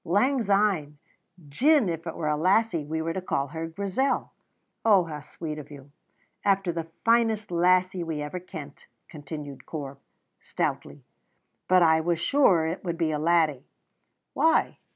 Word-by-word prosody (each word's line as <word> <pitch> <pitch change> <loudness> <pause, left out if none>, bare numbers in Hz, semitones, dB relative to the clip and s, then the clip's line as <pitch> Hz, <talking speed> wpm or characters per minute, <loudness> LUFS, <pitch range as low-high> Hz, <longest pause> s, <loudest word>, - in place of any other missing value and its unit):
"Lang 255 +9 +2
syne. 195 -8 +1 0.5
Gin 270 - +3
it 165 -1 -3
were 155 - -3
a 150 - +2
lassie 185 +1 +2
we 160 +2 -3
were 165 0 -2
to 190 - -3
call 140 -6 -2
her 160 +2 -5
Grizel 200 +10 -1 0.3
" - - -50
"Oh, 205 -5 +5
how 155 -3 -6
sweet 155 +1 -7
of 145 - -10
you!" 140 -1 -13 0.5
"After 195 -2 +2
the 165 -1 -5 0.2
finest 225 -3 +2
lassie 180 +1 +2
we 160 -2 -4
ever 150 +5 -4
kent," 160 -6 -10 0.2
continued 145 -2 -9
Corp, 140 -3 -7 0.4
stoutly. - - -4 0.6
"But 185 -1 +5
I 160 -1 +4
was 170 0 0
sure 190 - +3
it 165 +3 -4
would 170 -2 -3
be 165 -2 0
a 150 - -1
laddie." 155 -4 +1 0.7
"Why?" 325 0 +2
170 Hz, 155 wpm, -26 LUFS, 150-195 Hz, 0.7 s, Oh